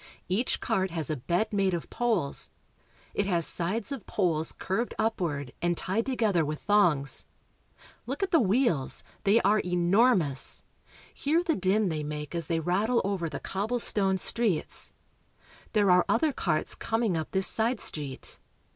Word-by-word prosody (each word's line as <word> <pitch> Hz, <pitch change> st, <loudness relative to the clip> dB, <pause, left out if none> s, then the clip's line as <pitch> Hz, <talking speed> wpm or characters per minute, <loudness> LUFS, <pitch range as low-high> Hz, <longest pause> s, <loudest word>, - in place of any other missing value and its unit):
Each 205 Hz, +8 st, 0 dB
cart 190 Hz, -5 st, 0 dB
has 160 Hz, -4 st, -3 dB
a -, -, 0 dB
bed 175 Hz, -, -1 dB
made 195 Hz, -3 st, +2 dB
of 170 Hz, -, -7 dB
poles; 220 Hz, -12 st, 0 dB, 0.6 s
it 200 Hz, -, 0 dB
has 170 Hz, -4 st, +1 dB
sides 190 Hz, -, -1 dB
of 270 Hz, -7 st, -6 dB
poles 165 Hz, -5 st, 0 dB
curved 225 Hz, +6 st, -3 dB
upward 150 Hz, -, -2 dB
and 175 Hz, -1 st, 0 dB
tied 215 Hz, +7 st, -2 dB
to 265 Hz, -, -1 dB
gether 205 Hz, -8 st, +2 dB
with 150 Hz, 0 st, -3 dB
thongs. 170 Hz, -, +2 dB, 0.8 s
Look 275 Hz, +9 st, -3 dB
at 385 Hz, -, -1 dB
the 330 Hz, -, +5 dB
wheels. 200 Hz, -, +1 dB, 0.2 s
They 205 Hz, +3 st, +5 dB
are 210 Hz, +1 st, +3 dB
enor 180 Hz, +8 st, +3 dB
mous. 140 Hz, -6 st, +1 dB, 0.5 s
Hear 320 Hz, +5 st, +1 dB
the 330 Hz, -3 st, +1 dB
din 190 Hz, +2 st, +1 dB
they 155 Hz, -2 st, -2 dB
make 150 Hz, 0 st, -5 dB
as 165 Hz, -3 st, -3 dB
they 165 Hz, -1 st, 0 dB
rattle 200 Hz, +9 st, +1 dB
over 190 Hz, -4 st, -1 dB
the 145 Hz, -, -5 dB
cobblestone 205 Hz, -2 st, 0 dB
streets. 205 Hz, -3 st, +1 dB, 0.8 s
There 205 Hz, -4 st, +4 dB
are 180 Hz, 0 st, +5 dB
other 295 Hz, +5 st, +2 dB
carts 170 Hz, -9 st, 0 dB
coming 225 Hz, -4 st, -1 dB
up 160 Hz, -1 st, -3 dB
this 190 Hz, 0 st, 0 dB
side 230 Hz, +1 st, 0 dB
street. 140 Hz, -4 st, -6 dB
190 Hz, 160 wpm, -28 LUFS, 165-225 Hz, 0.8 s, the